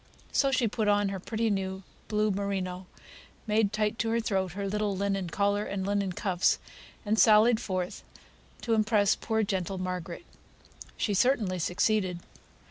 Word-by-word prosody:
So 275 - +3
she 255 -3 +2
put 215 0 -1
on 205 -1 +3
her 195 -1 -4
pretty 225 +3 -1
new 190 -1 -3 0.2
blue 215 0 +1
merino, 190 -2 -3 0.6
made 215 -2 +2
tight 215 0 -1
to 225 - 0
her 230 +1 +1
throat, 190 -5 -1
her 200 +1 -3
little 205 -1 -1
linen 195 -2 -1
collar 205 +3 +1
and 195 -2 -3
linen 200 -1 0
cuffs, 185 -1 +1 0.5
and 215 +1 +1
sallied 220 +1 +6
forth 185 -4 -4 0.6
to 230 - 0
impress 215 -2 +3
poor 220 -1 -1
gentle 190 -2 -2
Margaret. 185 - -5 0.7
She 210 - 0
certainly 205 -4 +2
succeeded. 180 +1 0
200 Hz, 150 wpm, -28 LUFS, 190-215 Hz, 0.7 s, sallied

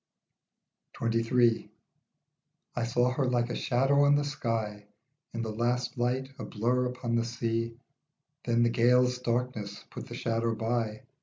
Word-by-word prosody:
26 115 0 0
XXIII. 120 -2 +3 1.0
I 120 - 0
SAW 120 +1 +2
her 130 0 0
like 120 -1 +1
a - - -2
shadow 135 +3 +3
on 145 0 +5
the 145 - +2
sky 110 -7 -3 0.4
In 115 0 -3
the 110 - -3
last 120 +2 -1
light, 125 +2 -1
a - - -4
blur 125 +3 0
upon 125 -1 -3
the 115 0 +2
sea; 115 0 -2 0.7
Then 120 0 +2
the 120 - +4
gale's 125 +1 +3
darkness 120 -4 -2
put - - -7
the - - -7
shadow 115 0 0
by. 115 +1 -1
120 Hz, 150 wpm, -29 LUFS, 115-125 Hz, 1.0 s, on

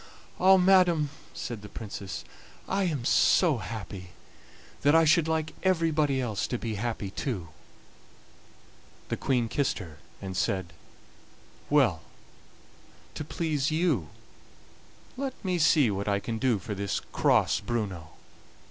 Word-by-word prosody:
"Ah! 190 +1 +7
madam," 180 -5 +4 0.2
said 115 -4 -6
the 105 - -10
Princess, 100 -3 -7 0.4
"I 195 0 0
am 145 -9 -2
so 160 +2 +4
happy 100 -5 -7 0.7
that 145 +2 +4
I 165 0 +6
should 160 +1 +4
like 160 -1 -1
everybody 160 -6 +2
else 110 -5 -2
to 125 - -2
be 115 -1 -4
happy 105 -2 -3
too." 100 -9 -4 1.6
The - - -1
Queen 125 -4 +1
kissed 135 +4 0
her, 80 -8 -9 0.2
and 95 -1 -6
said: 95 -2 -1 1.0
"Well, 125 - +3 1.1
to - - -5
please 150 -2 -1
you, 155 - +1 1.1
let 270 -1 -3
me 180 -2 0
see 150 -7 +4
what 100 +1 -3
I 100 -1 +2
can 115 +2 -4
do 125 -2 +2
for 100 +3 -5
this 100 0 -2
cross - - +3
Bruno." 100 -9 -3
125 Hz, 130 wpm, -28 LUFS, 100-160 Hz, 1.6 s, Ah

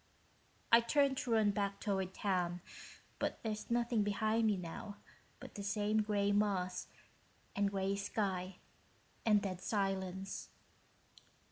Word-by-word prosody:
I 230 0 +9
turn 280 +3 +3
to 265 -2 -3
run 215 -2 +4
back 200 0 -1
toward 190 -3 -1
town, 180 -3 0 0.6
but - - -1
there's 215 -1 -3
nothing 235 -1 +2
behind 215 +2 +2
me 210 -2 +2
now 180 +3 -6 0.4
but - - -10
the 205 - -6
same 210 +1 +1
gray 205 -1 +1
moss 200 -3 +1 0.7
and 200 0 +2
gray 195 0 0
sky 190 -2 -2 0.7
and 210 -2 +5
dead 185 -2 -3
silence." 195 -1 -2
200 Hz, 125 wpm, -36 LUFS, 190-215 Hz, 0.7 s, I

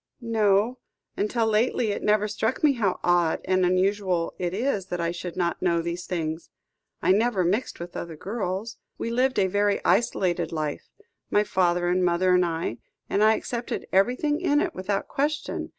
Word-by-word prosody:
"No; 225 0 +1 0.4
until 225 +3 0
lately 220 +1 +1
it - - -3
never 210 0 +2
struck 220 +6 -2
me 295 -2 +5
how 210 -7 0
odd 175 -2 +2
and 185 0 +2
unusual 185 -1 +1
it 175 -1 -1
is 205 -2 -1
that 180 - -4
I 170 0 0
should 175 0 -6
not 170 -2 -1
know 170 -2 +2
these 170 +1 -4
things. 160 -2 -3 0.5
I - - +4
never 210 -1 +2
mixed 200 +9 -1
with 175 0 -8
other 170 -2 -5
girls. 200 +4 -4 0.2
We 230 - -3
lived 255 +2 +1
a 195 - +4
very 205 +2 +1
isolated 190 -7 +1
life, 155 -3 -4 0.4
my 205 - +3
father 175 -3 +1
and 180 +1 +2
mother 180 +1 +3
and 180 0 +4
I, 165 -8 -2 0.3
and 205 - +3
I 220 +1 +5
accepted 240 +2 -4
everything 250 - +2
in 295 -5 +3
it - - -1
without 195 +2 -2
question. 300 +3 -2
195 Hz, 175 wpm, -25 LUFS, 175-225 Hz, 0.5 s, me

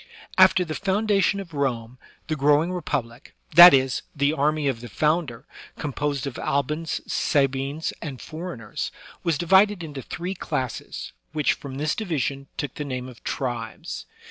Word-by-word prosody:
After 185 -1 +6
the 155 - -4
foundation 200 +1 +1
of 180 -5 -8
Rome, 125 -4 -2 0.3
the 155 - -2
growing 150 +4 +3
republic, 125 -9 -4 0.2
that 175 +3 +12
is, 130 -1 +2
the 140 +1 +2
army 150 0 +1
of 125 -4 -1
the 120 - -8
founder, 150 - 0 0.3
composed 145 -2 -2
of 135 -3 -5
Albans, 150 +4 -1
Sa 140 -3 +2
bines, 135 +4 -3
and 140 -6 -6
foreigners, 155 - -6 0.3
was 165 -4 +1
divided 190 +3 +4
into 145 -4 -6
three 175 +8 -5
classes, 130 -8 -4 0.2
which, 150 -2 +2
from 135 -2 -8
this 150 +2 0
division, 140 - -2
took 145 -3 -3
the 150 - -5
name 130 -3 -4
of 125 -2 -13
tribes. 120 -4 -4
145 Hz, 150 wpm, -24 LUFS, 135-170 Hz, 0.3 s, that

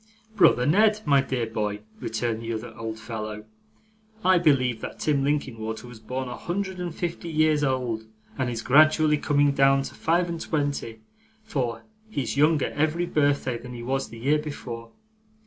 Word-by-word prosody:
'Brother 125 -11 +5
Ned, 210 +7 +4
my 140 -2 +5
dear 130 -3 -2
boy,' 105 -2 -3 0.2
returned 115 0 -2
the 115 0 -4
other 110 +2 -6
old 115 -1 -5
fellow, 110 -1 -6 0.8
'I 185 -1 +6
believe 130 -8 +2
that - - -6
Tim 145 -3 +1
Linkinwater 115 -6 -2
was 120 -2 -11
born 125 +4 -4
a 125 - -5
hundred 190 +1 -3
and 175 -2 -4
fifty 170 -1 -4
years 155 -1 +2
old, 125 -5 -1 0.3
and 130 -2 -1
is 115 -2 -4
gradually 155 +2 +5
coming 145 -1 +3
down 135 0 +4
to - - -7
five 175 +2 +1
and 170 -1 -4
twenty; 145 -9 -2 0.4
for 125 - -2 0.3
he's 130 - -2
younger 150 0 +3
every 155 +4 +1
birthday 145 -6 +1
than 125 +1 -9
he 120 - -7
was 135 +2 -1
the 115 - -10
year 140 +6 +2
before. 120 -6 -7
135 Hz, 165 wpm, -25 LUFS, 115-155 Hz, 0.8 s, I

